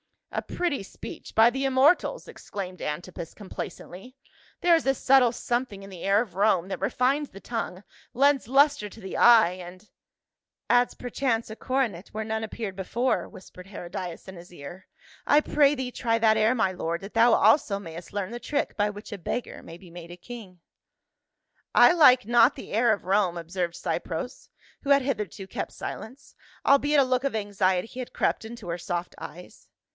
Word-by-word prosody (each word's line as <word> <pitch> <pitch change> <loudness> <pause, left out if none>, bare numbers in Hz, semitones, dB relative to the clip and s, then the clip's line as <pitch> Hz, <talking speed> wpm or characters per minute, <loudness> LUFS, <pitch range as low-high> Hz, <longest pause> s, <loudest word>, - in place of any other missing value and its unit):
"A - - -1
pretty 345 - -2
speech, 195 - -10
by 225 +1 +7
the 270 +3 -2
immortals!" 275 - +2
exclaimed 185 -3 -7
Antipas 165 +2 -5
complacently. 195 +3 -9 0.2
" - - -30
There 350 -1 +5
is 325 - -1
a 270 - +3
subtile 260 -3 +4
something 240 -4 -3
in 195 - -10
the 180 -3 -9
air 200 +2 +3
of 205 -8 -7
Rome 190 -3 +2
that 195 - -4
refines 265 +8 0
the 195 - -13
tongue, 225 -5 -5 0.3
lends 275 -1 +3
luster 280 -3 +3
to 220 - -14
the 190 - -6
eye, 225 -7 +7
and 185 +2 -10 0.2
— - - -64
" - - -65
" - - -62
Adds 245 0 +3
perchance 245 -2 -2
a 215 - -7
coronet 235 -9 -2
where 220 +1 -3
none 220 0 -3
appeared 210 -3 -6
before," 235 +7 -1
whispered 185 0 -13
Herodias 180 -2 -7
in 190 -1 -9
his 175 +1 -13
ear. 175 +5 -10 0.2
" - - -25
I 295 - +6
pray 295 -1 +3
thee 260 -2 -4
try 230 -2 0
that 220 -1 +3
air, 220 +3 +3
my 215 -6 +1
lord, 170 -2 -3
that 195 +2 -9
thou 230 +1 +5
also 220 -1 +4
may.st 170 -3 -9
learn 205 0 -3
the 240 - -5
trick 290 - -2
by 205 0 +2
which 205 +2 -10
a 205 - -5
beggar 235 +8 -4
may 165 - -11
be 175 -1 -16
made 170 0 -10
a 175 - -10
king." 190 -3 -11 0.6
" - - -39
I - - +8
like 260 -8 +6
not 240 +3 +5
the 265 - -10
air 225 +2 +3
of 205 - -5
Rome," 190 -2 +1
observed 170 +1 -3
Cypres, - - -4 0.3
who 285 - -1
had 280 0 +6
hitherto 210 -7 -3
kept 190 - -5
silence, 255 +6 -8 0.3
albeit 285 +1 +4
a - - +5
look 255 +1 0
of 275 - 0
anxict) 200 -2 0
had 250 - -6
crept - - 0
into 225 -5 -9
her 170 +1 -3
soft 175 0 -4
eyes. 180 +1 -11
220 Hz, 195 wpm, -26 LUFS, 185-255 Hz, 0.6 s, I